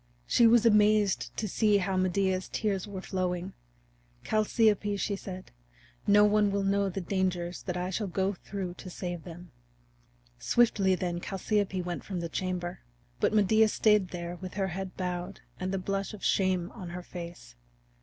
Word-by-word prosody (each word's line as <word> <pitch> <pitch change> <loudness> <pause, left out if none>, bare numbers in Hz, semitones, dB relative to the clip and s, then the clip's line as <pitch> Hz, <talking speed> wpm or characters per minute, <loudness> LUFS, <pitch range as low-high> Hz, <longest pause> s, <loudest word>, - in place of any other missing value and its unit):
She 235 - +5
was 235 0 +5
amazed 210 -2 +4
to 215 - -1
see 210 +1 +3
how 190 0 -1
Medea's 185 0 +1
tears 200 -2 -1
were 195 -2 -6
flowing. 185 0 -2 0.7
"Chalciope," 215 -1 +2
she 200 +1 -1
said, 185 -1 -8 0.6
"no 205 +1 +7
one 210 0 +3
will 200 0 0
know 200 0 +2
the 190 +1 -4
dangers 180 -1 -1
that 180 -2 -4
I 180 +1 -2
shall 205 +2 -2
go 190 +2 0
through 190 -1 -5
to 185 - -8
save 175 -2 -5
them." 175 0 -10 0.9
Swiftly 195 - +3
then 175 -1 -3
Chalciope 195 -1 -1
went 175 -1 -4
from 190 -3 -4
the 170 -1 -4
chamber. 180 0 -3 0.4
But - - +2
Medea 215 +2 +5
stayed 210 -2 +3
there 175 0 -6
with 185 0 -8
her 195 -2 0
head 190 +1 -6
bowed 180 +1 -4 0.2
and 185 0 -2
the 195 - 0
blush 195 +2 -3
of 200 - -7
shame 185 -2 +1
on 185 -6 -8
her 175 +1 -6
face. 170 - -9
190 Hz, 165 wpm, -29 LUFS, 180-205 Hz, 0.9 s, no